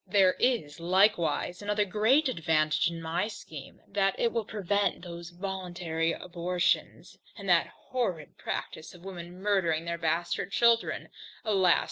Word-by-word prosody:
There 190 -1 +5
is 225 - +1
likewise 180 -1 +2
another 210 0 +1
great 220 +10 +3
advantage 160 -6 +2
in 165 -1 -7
my 170 +5 0
scheme, 155 -10 -10
that 195 -1 +1
it 235 - +2
will 230 -2 -1
prevent 200 -2 0
those 170 -1 -7
voluntary 175 -3 -2
abortions, 180 0 -1 0.2
and - - -8
that - - +4
horrid 190 - -4
practice 160 +3 -5
of 175 +1 -15
women 180 -1 -8
murdering 185 -5 +1
their 170 0 -3
bastard 170 +3 -1
children, 235 +1 +2 0.4
alas! 190 -5 +4
180 Hz, 135 wpm, -29 LUFS, 170-205 Hz, 0.4 s, There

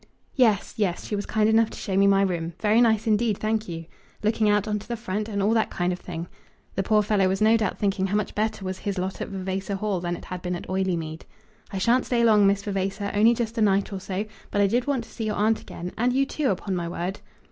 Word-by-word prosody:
"Yes; 225 -7 +2
yes. 190 -5 -1
She 210 - -2
was 205 - -3
kind 215 -1 +2
enough 220 0 +4
to - - -10
show 195 - -3
me 195 +1 +5
my 195 0 +4
room. 170 -3 -2
Very 220 +2 +4
nice 220 -3 +3
indeed, 215 -1 +2
thank 215 -1 -1
you; 165 -1 -5 0.4
looking 215 0 +2
out 205 -1 +3
into 210 -1 -3
the 235 0 -3
front, 215 -1 -3
and 200 -2 -1
all 210 - +3
that 225 -1 +2
kind 180 0 -1
of 180 - -6
thing." 170 -1 -6 0.5
The 195 - 0
poor 210 +2 +3
fellow 200 -2 +2
was 190 +1 0
no 220 +1 +5
doubt 215 -4 0
thinking 195 -2 0
how 200 - -1
much 210 - -2
better 215 -2 -1
was 185 0 -4
his 200 -1 -3
lot 185 +1 -3
at - - -2
Vavasor 190 +1 -3
Hall 200 -1 -1
than 175 0 -2
it - - -10
had 180 -1 -6
been 180 0 -2
at 175 - -7
Oileymead. 170 -4 -2 0.5
"I 195 - -4
shan't 235 +7 +2
stay 235 -2 +2
long, 210 -3 +6
Miss 200 0 +2
Vavasor, 195 0 -2
only 225 +3 +5
just 230 0 -2
a - - +2
night 200 -1 +2
or 195 - -3
so; 190 +2 -3 0.2
but 205 - -1
I 200 - +5
did 240 +6 +1
want 270 -4 0
to 225 - -15
see 225 - -4
your 210 -1 -1
aunt 220 +2 +2
again, 175 +1 -7
and 245 +2 +3
you, 270 +2 +2
too, 285 0 -1
upon 190 0 -1
my 170 -1 -2
word." 180 +3 -4
205 Hz, 260 wpm, -25 LUFS, 190-220 Hz, 0.5 s, long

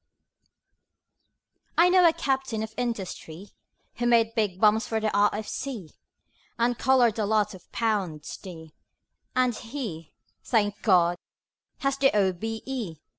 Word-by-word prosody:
I 340 +2 +7
know 360 -1 +6
a - - +6
Captain 265 -8 -1
of 220 0 -7
Industry, 200 -6 -5 0.5
Who 240 0 0
made 230 -1 +3
big 210 -5 -1
bombs 215 +1 +4
for 225 - -1
the 215 -1 -1
R.F.C., 210 - -1 0.7
And 235 +1 +1
collared 240 -4 +3
a 215 - +1
lot 210 -1 +1
of 185 - -15
£ 210 -8 0
s. 150 - -8
d. 160 -5 -11 0.6
And 255 -1 +3
he 225 - -7 0.3
thank 205 -4 0
God! 175 -4 +3 0.6
has 275 -1 0
the 270 - +5
O.B.E. 220 +2 -2
220 Hz, 125 wpm, -26 LUFS, 195-245 Hz, 0.7 s, I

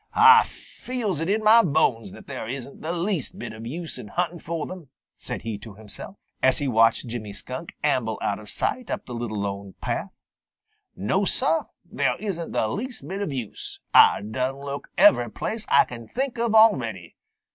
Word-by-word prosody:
"Ah 450 +1 +8
feels 225 - -4
it 165 +3 -2
in 215 +2 +1
mah 220 +2 +8
bones 130 - +1
that - - -12
there - - -6
isn't 130 +2 -7
the 160 - -3
least 175 - -1
bit 110 -1 -6
of 110 +1 -8
use 165 +6 -5
in - - -8
huntin' 175 - -2
fo' 165 -1 -4
them," 180 -7 -9 0.3
said - - -5
he 110 -3 -4
to 105 -1 -11
himself, 110 - -8 0.3
as 130 - +5
he 145 - -1
watched 115 -1 +4
Jimmy 115 -3 -5
Skunk 130 +9 -7
amble 125 -7 +1
out 100 - -1
of 105 -1 -11
sight 255 -2 -1
up - - -3
the 125 - -8
Lone 120 -1 -3
Little 100 -2 -4
Path. - - -4 0.8
"No, 190 - 0
Sah, 270 +10 +1 0.2
there - - 0
isn't 185 -6 -4
the 110 - +1
least 225 - -5
bit 195 +4 -4
of 200 - -2
use. 125 -6 -6
Ah - - +7
done 130 +5 -2
look 140 0 -6
every 120 -2 +6
place 220 - -4
Ah 140 - +6
can 115 -2 -9
think 255 -2 -3
of 230 -2 +1
already. 115 - +3
140 Hz, 190 wpm, -25 LUFS, -, 0.8 s, Ah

